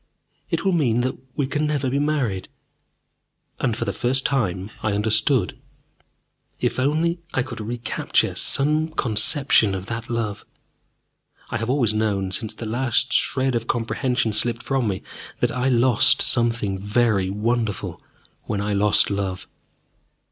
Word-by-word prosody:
It - - -1
will 195 - +3
mean 125 -9 +2
that 130 +1 -1 0.2
we 145 - 0
can 150 +3 -1
never 145 -3 -1
be 135 +2 0
married!" 135 -11 -1 1.1
And, 120 -4 0
for - - -2
the - - -2
first 130 +2 +1
time, 100 -7 -1
I 110 - 0
understood. 110 +5 +1 1.0
If - - -1
only 160 +6 +1 0.2
I 125 - +2
could 125 - -7
re 115 +3 -4
capture 115 -1 0
some 150 +3 +1
conception 120 -5 +2
of 95 0 -5
that 115 +1 -5
love! 115 -4 -2 1.1
I 120 - 0
have 115 +1 -3
always 125 -5 +2
known, 100 -3 0
since 110 +3 -3
the 115 - -6
last 120 +2 0
shred 130 -1 +1
of 115 -1 -2
comprehension 120 0 0
slipped 115 +2 0
from 135 -4 0
me, 95 -2 -3 0.4
that - - +1
I 130 +1 0
lost 120 -2 +4
something 115 -5 +1
very 105 -2 +1
wonderful 110 0 -2 0.4
when 105 - -2
I 105 +1 -1
lost 100 +1 +3
love. 95 -2 -3
115 Hz, 150 wpm, -23 LUFS, 105-130 Hz, 1.1 s, lost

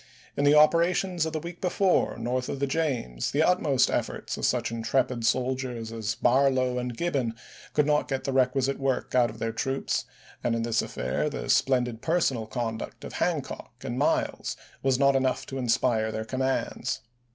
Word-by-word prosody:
In 145 - +1
the 145 +1 +6
operations 170 +2 +3
of 160 - -5
the 155 - -1
week 170 +2 -8
before, 185 -4 +2
north 125 +2 -2
of 140 - -3
the 140 - +1
James, 135 - -1
the 150 +3 +2
utmost 155 -7 +3
efforts - - -2
of - - 0
such - - 0
intrepid 115 +1 0
soldiers 125 -3 -1
as 110 -1 -3
Barlow 130 +1 +2
and 125 -1 -4
Gibbon 135 -10 -1 0.4
could 150 - +3
not 150 0 +2
get 135 -1 -2
the 135 -1 -2
requisite 135 +1 +2
work 135 -2 -1
out 125 -2 +4
of 110 - -10
their 115 0 -2
troops, 135 +4 -1 0.4
and 120 -1 +1
in 115 - -1
this 115 -1 +1
affair, - - -2
the - - -5
splendid 125 -4 +2
personal 140 -9 +1
conduct 115 -1 -4
of - - -7
Hancock - - -2
and - - -3
Miles - - 0 0.2
was 135 -2 +2
not 140 0 +4
enough 130 -1 +1
to 135 - -5
inspire 115 -2 +1
their 110 0 -4
commands. 130 +2 -2
130 Hz, 175 wpm, -27 LUFS, 115-140 Hz, 0.4 s, the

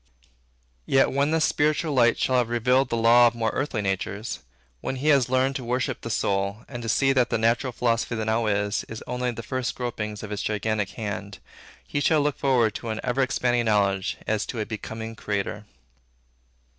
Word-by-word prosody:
Yet 135 0 +4
when 140 +2 +1
this 160 0 +2
spiritual 150 +1 +1
light 120 -3 +4
shall 130 - +1
have 120 -2 +1
revealed 125 +3 +2
the 115 - -1
law 120 +1 +6
of 120 - -1
more 115 -1 0
earthly 130 -6 -2
natures, 100 +3 -3 0.4
when 130 - -3
he 140 +4 0
has 135 -4 +4
learned 130 +1 +2
to 130 - -7
worship 125 +1 -2
the 115 - -6
soul, 100 -1 -1
and 120 -3 -7
to 115 - -4
see 135 +5 +3
that 130 -2 +2
the - - +1
natural 115 +4 +1
philosophy 115 0 0
that 110 -1 -2
now 110 +1 +1
is, 100 0 0
is 110 - -8
only 125 0 -2
the 115 -1 -5
first 130 +2 -3
gropings 105 -4 -4
of 105 - -7
its 105 - -3
gigantic 105 -1 -1
hand, 100 -2 -5 0.5
he 145 - -2
shall 155 +1 +3
look 145 -1 -1
forward 125 -6 +2
to 115 - -6
an 110 0 -3
ever 125 +1 0
expanding 120 -2 +1
knowledge 100 -2 +1
as 110 -1 -1
to 120 - -5
a 105 - -1
becoming 110 +1 -6
creator. 105 0 -3
115 Hz, 195 wpm, -25 LUFS, 110-130 Hz, 0.5 s, law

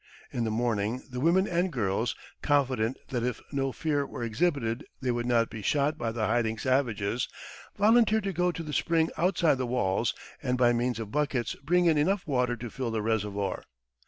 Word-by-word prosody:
In 120 -2 -1
the - - 0
morning 115 +1 -1
the 125 - -4
women 175 +7 +3
and 175 +1 0
girls, 110 -2 0 0.3
confident 130 -5 +1
that 125 -2 -1
if 125 +1 -2
no 135 -2 0
fear 145 0 0
were 130 -3 -6
exhibited 120 0 0 0.2
they 130 -2 0
would 120 0 -2
not 115 -2 +2
be 110 - -6
shot 145 +6 +1
by 115 -1 -1
the 110 -1 -1
hiding 115 -1 +1
savages, 120 -3 0 0.5
volunteered 220 0 +4
to 195 -1 -2
go 180 +1 +2
to 165 - -6
the 150 -2 -6
spring 165 0 +2
outside 170 -5 +2
the 130 - -1
walls, 120 -6 0 0.3
and 125 0 0
by 120 -1 +4
means 120 0 0
of 110 -2 -5
buckets 140 -5 0
bring 175 +4 +3
in 160 -3 +4
enough 185 +6 +1
water 125 -4 +1
to 120 -1 -7
fill 130 -3 -3
the 110 -2 -2
reservoir. 105 -3 -1
125 Hz, 190 wpm, -28 LUFS, 115-155 Hz, 0.5 s, volunteered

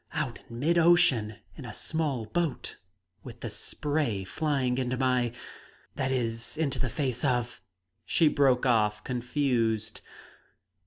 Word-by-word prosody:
Out 150 -6 -2
in 115 - -8
mid 165 +7 +2
ocean, 130 -11 +4 0.2
in 140 - -9
a 125 - -6
small 150 -8 -2
boat, 165 +2 -2 0.5
with 120 -2 -10
the 115 - -4
spray 120 -1 -2
flying 130 +2 0
into 130 0 -1
my 125 -2 +2 0.6
that 130 0 -1
is, 115 +1 -2
into 150 -4 -1
the 130 - 0
face 125 -1 -2
of 125 -3 0 0.2
" 90 +2 -51
She 165 - +3
broke 135 -3 +3
off, 105 -4 +2
confused. 120 -4 -1
125 Hz, 140 wpm, -28 LUFS, 115-145 Hz, 0.6 s, ocean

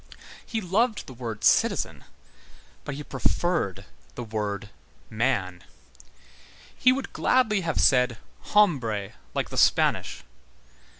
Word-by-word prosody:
He 225 - -3
loved 215 +5 0
the 130 - -10
word 115 -3 -6
citizen, - - +2 0.8
but - - -4
he 150 - -6
preferred 135 - -1 0.3
the 120 - -5
word 105 -2 -4 0.4
man. 105 -6 -1 1.1
He 255 - +4
would 265 +1 -3
gladly 220 -6 +2
have 165 -3 -1
said: 125 -3 +4 0.4
Hombre, 125 - +2 0.2
like - - -1
the - - -6
Spanish. - - +2
130 Hz, 110 wpm, -26 LUFS, -, 1.1 s, He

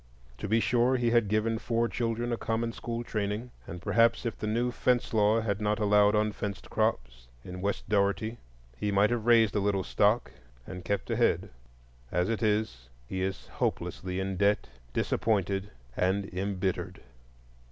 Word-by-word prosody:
To - - -4
be 110 +3 +3
sure, 125 +3 +2
he 120 -1 +1
had 115 -3 +3
given 110 +2 +1
four 115 0 0
children 120 0 -2
a - - +2
common 115 +1 -1
school 115 0 -4
training, 110 +2 -3 0.2
and 90 +2 -8
perhaps 115 +4 +3
if 115 - -2
the 105 - -4
new 120 +3 0
fence 125 -1 +1
law 110 +1 +3
had 105 -2 -2
not 105 0 +1
allowed 105 -1 +4
unfenced 105 -1 -2
crops - - -1 0.2
in 90 0 -7
West 100 +1 -2
Dougherty 105 +2 0 0.4
he 105 +11 -2
might 100 +3 +3
have 120 -1 -1
raised 115 -3 +5
a - - +3
little 100 -1 +1
stock 105 +6 +2 0.3
and 90 -1 -8
kept 100 +3 -2
ahead. - - +1 0.6
As 90 +3 +1
it 115 - -2
is, 105 - 0 0.2
he 95 +9 -4
is 95 0 -3
hopelessly 95 0 -3
in 95 0 -2
debt, 100 +2 +2 0.2
disappointed, 100 - 0 0.3
and 95 +2 +1
embittered. 95 0 -2
105 Hz, 165 wpm, -29 LUFS, 100-115 Hz, 0.6 s, raised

